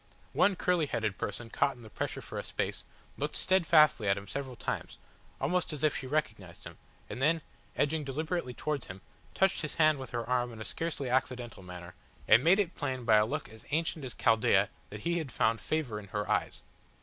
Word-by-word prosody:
One 200 - +4
curly 175 -4 +1
headed 110 -6 -2
person 115 -1 -4
caught 140 -1 +1
in 120 - -14
the 110 - -11
pressure - - -3
for - - -6
a - - -4
space, - - -3 0.3
looked - - -2
steadfastly 160 - +4
at 100 - +3
him 100 - -6
several 130 +4 -4
times, - - -4 0.4
almost 180 -1 0
as 150 -1 -4
if 155 - +3
she 130 - -4
recognised 110 - -3
him, - - -10 0.3
and 125 - -6
then, 160 +2 +3 0.3
edging 150 +1 +1
deliberately 145 -1 -3
towards 150 -3 -2
him, 95 +1 -9 0.3
touched 190 0 +3
his 150 - -3
hand 155 -3 +4
with 130 -2 -7
her 120 -1 -3
arm 125 -1 +1
in 110 - -10
a 110 - -6
scarcely 160 -5 -3
accidental 125 -3 -1
manner, 90 -1 -9 0.3
and 115 +3 +7
made 175 +4 +6
it 190 -5 +1
plain 130 -4 -3
by 110 -2 +6
a 105 0 +4
look 150 +5 -3
as 110 0 -14
ancient 160 0 0
as 125 -3 -6
Chaldea 105 -3 +3 0.2
that 105 0 -8
he 170 +5 0
had 150 -5 -5
found 110 -1 +1
favour 140 -9 -1
in 100 - -11
her 105 +1 -3
eyes. - - -1
130 Hz, 210 wpm, -31 LUFS, 110-155 Hz, 0.4 s, and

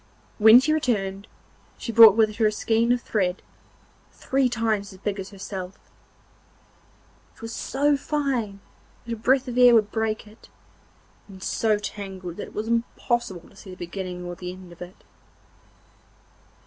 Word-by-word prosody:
When 220 +3 +9
she 310 +4 +1
returned 200 -9 -1 0.5
she 230 - -5
brought 225 -2 +9
with 215 -2 +2
her 220 -2 +3
a - - +1
skein 225 +2 +1
of 245 -1 +1
thread, 185 -4 -1 0.7
three 265 -1 0
times 220 -4 -1
as 190 - -13
big 200 +1 -4
as 190 - -6
herself; 190 -1 -7 1.6
it - - -20
was 225 0 -6
so 285 +4 +1
fine 265 -9 -2 0.4
that 235 - -4
a - - -2
breath 255 +4 +1
of 250 0 -2
air 245 -1 +8
would 215 -2 +2
break 220 -1 -2
it, 215 +1 -18 0.8
and 190 -2 -12
so 220 -2 +1
tangled 190 -4 -7
that - - -6
it - - -16
was 215 +1 -3
impossible 235 -5 -2
to - - -21
see 195 - -13
the 185 - -9
beginning 180 0 -6
or 175 - -5
the 180 0 -7
end 185 -1 -12
of 170 - -19
it. 180 +1 -11
215 Hz, 160 wpm, -24 LUFS, 190-235 Hz, 1.6 s, When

